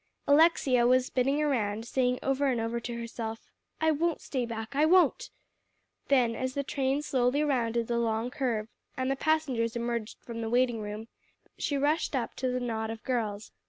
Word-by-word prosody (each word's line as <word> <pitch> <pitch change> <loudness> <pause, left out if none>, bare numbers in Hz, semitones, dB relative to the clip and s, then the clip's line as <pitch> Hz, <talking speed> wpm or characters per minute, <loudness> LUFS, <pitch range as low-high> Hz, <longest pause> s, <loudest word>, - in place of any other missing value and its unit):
Alexia 285 -5 +4
was 255 0 +4
spinning 270 +3 +1
around, 225 -6 0
saying 250 0 +1
over 270 +1 +1
and 250 -3 +1
over 230 +1 -2
to 235 0 -5
herself, 225 -1 -5 0.3
"I 315 0 +3
won't 325 +2 0
stay 255 -4 -3
back 225 +2 -6
I 295 - +3
won't." 370 +9 +4 0.8
Then, 250 -4 +3
as 260 +1 -3
the 280 - 0
train 275 +1 -1
slowly 260 +1 +1
rounded 235 -5 0
the 235 +1 -1
long 230 +1 -1
curve 235 -7 -1 0.3
and 260 +1 0
the - - +1
passengers 270 -7 0
emerged 235 -2 -3
from 230 -1 -7
the 225 - -3
waiting 240 -1 +2
room, 210 +1 -6 0.5
she 285 - 0
rushed 295 +2 +1
up 245 -3 -2
to 260 - -1
the 250 0 -1
knot 225 -3 -2
of 225 0 -6
girls. 215 -5 -2
250 Hz, 180 wpm, -29 LUFS, 230-275 Hz, 0.8 s, Alexia